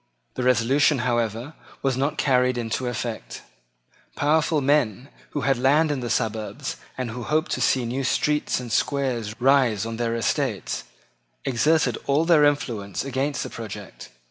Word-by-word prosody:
The - - -4
resolution, 125 +4 +3
however, 120 +3 -1 0.3
was 135 -2 +1
not 140 +4 -1
carried 125 -2 +2
into 120 +2 -2
effect. 120 -1 -5 0.7
Powerful 155 +1 +2
men 135 -3 +1 0.2
who 145 - -3
had 135 -3 +1
land 150 +5 +3
in 145 - -1
the 120 -1 -4
suburbs 110 -1 -2 0.2
and 125 -3 -3
who 125 +2 -6
hoped 155 +5 0
to - - -1
see 130 -2 +2
new 130 +4 -2
streets 150 +2 +1
and 120 -2 -7
squares 120 -5 -1
rise 125 -5 +3
on 115 0 -4
their 115 -1 -1
estates, 115 - -1 0.6
exerted 150 +6 +2
all 145 +3 +3
their 160 -3 +5
influence 120 -9 -1
against 135 +1 -1
the - - -6
project. 105 -3 -8
130 Hz, 150 wpm, -24 LUFS, 115-145 Hz, 0.7 s, their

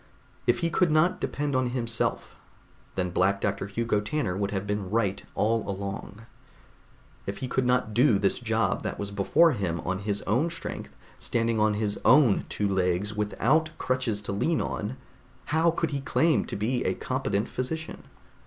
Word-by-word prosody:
If - - +3
he 170 0 0
could 175 +1 +3
not 155 +4 +3
depend 145 -1 -1
on 130 -1 +2
himself, 120 -2 -2 0.6
then 90 -1 -1
Black 95 +3 +2
Doctor 95 - -1
Hugo 115 +1 0
Tanner 105 -4 -1
would 100 0 -1
have 100 -1 -3
been 105 -2 -2
right 100 -2 0
all 115 +2 +2
along. 100 +2 -5 1.0
If 100 +1 -3
he 130 - -4
could 125 0 0
not 125 -3 +1
do 120 -1 +5
this 100 0 +1
job - - 0
that - - -4
was 100 0 -4
before 100 - +4
him 90 - -2
on 95 +1 -2
his 100 0 -2
own 125 +11 +1
strength, 170 - -6 0.3
standing 115 -1 0
on 105 0 +3
his 105 -1 -2
own 130 -6 +5
two 105 - -1
legs 95 +1 0
without 125 +9 +1
crutches 125 -5 -1
to 100 - -4
lean 155 +12 +1
on, 110 +5 -3 0.5
how 160 +2 +3
could 165 -1 -1
he 140 -1 -2
claim 160 +3 +2
to - - -5
be 120 +5 0
a - - 0
competent 130 -5 -1
physician? 155 +5 -5
110 Hz, 170 wpm, -27 LUFS, 100-130 Hz, 1.0 s, do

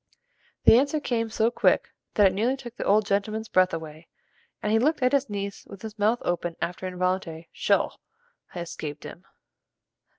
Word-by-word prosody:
The 230 - +8
answer 285 +3 +1
came 230 -5 -1
so 220 +1 +1
quick - - +2 0.3
that 205 - +5
it 190 - +4
nearly 235 +7 +1
took 240 -3 -10
the - - -4
old 210 +1 +4
gentleman's 215 +3 -1
breath 185 0 +4
away, 160 0 -7 0.6
and 210 - 0
he 225 - +4
looked 295 +3 +1
at 255 - +4
his 280 -3 +1
niece 200 -1 -4
with 200 0 -11
his 220 -1 -8
mouth 220 +4 +2
open 175 -1 -2
after 180 +2 -3
an 185 - -6
involuntary, 180 -3 -2
"Sho!" - - +2 0.6
had 175 - -6
escaped 155 -3 -7
him. 180 - -10
205 Hz, 185 wpm, -26 LUFS, 180-230 Hz, 0.6 s, The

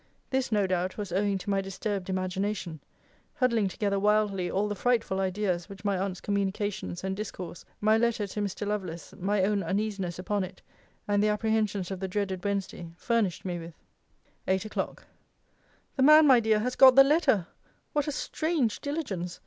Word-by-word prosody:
This, 265 -2 0
no 205 -2 +3
doubt, 185 0 -1
was 205 -4 -5
owing 200 +2 +1
to 195 +2 -7
my 195 0 +2
disturbed 195 0 -4
imagination; 185 -2 -2 0.6
huddling 235 -6 +2
together 200 +1 -1
wildly 205 -3 +2
all 200 +2 0
the 205 - -2
frightful 220 -2 0
idea 190 -1 0
which 200 +1 -12
my 200 -1 +2
aunt's 185 0 -2
communications 200 -2 -2
and 190 0 -2
discourse, 190 -4 -7 0.2
my 215 +1 +4
letter 230 -2 +1
to 205 +1 -5
Mr. 205 +1 -3
Lovelace, 190 -5 -4
my 195 +1 +1
own 200 +1 +1
uneasiness 195 -1 -2
upon 195 +2 -1
it, 185 +1 -8 0.5
and 205 0 +2
the 210 - +3
apprehensions 210 -3 0
of 190 - -4
the 190 - -3
dreaded 190 -1 -2
Wednesday, 195 -4 -3
furnished 220 -5 0
me 175 -2 -3
with. 165 0 -10 0.7
EIGHT 190 +2 +1
O'CLOCK. 215 - -4 0.9
The - - +1
man, 305 +3 +8
my 260 -4 +7
dear, 220 -1 +2
has 250 +3 -2
got 260 -2 +8
the 270 - +10
letter! 275 - +3 0.5
What 295 -1 0
a - - 0
strange 300 -5 -1
diligence! 215 - -4
200 Hz, 175 wpm, -28 LUFS, 190-215 Hz, 0.9 s, the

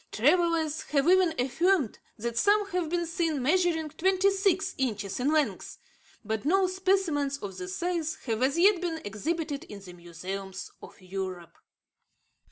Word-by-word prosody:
Travellers 320 +3 +2
have 280 +1 +3
even 365 -2 +4
affirmed 290 - +1 0.2
that 235 +1 -4
some 410 - +3
have 355 -3 -1
been 345 0 0
seen 330 -2 -1
measuring 320 +2 +1
twenty 380 +4 +2
six 390 -1 +1
inches 210 -6 -2
in 270 +4 +1
length; 310 -2 0 0.5
but 220 0 -2
no 380 +6 +3
specimens 370 -7 0
of 200 -7 -7
this 180 0 -5
size 340 -3 -1
have 225 -2 -1
as 270 +4 +2
yet 375 +1 +5
been 335 -3 -2
exhibited 295 - -3
in 205 - -9
the 185 -2 -12
museums 185 +3 -7
of - - -13
Europe. 185 -2 -6
310 Hz, 150 wpm, -28 LUFS, 215-360 Hz, 0.5 s, yet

